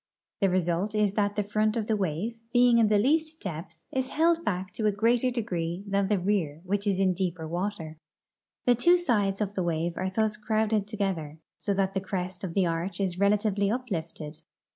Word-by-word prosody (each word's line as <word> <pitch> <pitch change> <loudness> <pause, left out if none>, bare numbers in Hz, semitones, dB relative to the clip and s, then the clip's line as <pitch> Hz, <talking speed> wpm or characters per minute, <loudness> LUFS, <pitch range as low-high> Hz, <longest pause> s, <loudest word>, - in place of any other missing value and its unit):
The 195 - +3
result 180 +3 0
is 210 -2 +2
that 205 -1 0
the 210 - +1
front 215 +2 0
of 220 - -1
the 220 - +1
wave, 195 +4 -2 0.2
being 245 -1 +5
in 225 - +5
the 210 0 +3
least 310 +7 +1
depth, 165 -2 -6
is 260 -1 -1
held 335 +1 +2
back 185 - -2
to 215 - 0
a - - +4
greater 230 +5 +2
degree 185 -7 -3
than 200 -1 +1
the 205 0 +2
rear 180 -6 0
which 200 +2 -1
is 195 -2 +2
in 190 -1 +3
deeper 175 -3 -3
water. 170 -2 -4 0.7
The 245 - +6
two 345 +10 +5
sides 210 - +1
of 205 -1 -1
the 190 - -1
wave 170 0 -1
are 185 +1 -1
thus 215 +2 0
crowded 215 -1 0
together, 190 -8 -3 0.2
so 200 - -1
that 195 0 0
the 195 - -1
crest 185 -1 -4
of 175 -3 -4
the 195 -2 +3
arch 170 +3 -2
is 185 -3 -1
rela 200 +2 +3
tively 205 -1 0
uplifted. 165 -10 -4
200 Hz, 205 wpm, -28 LUFS, 180-215 Hz, 0.7 s, The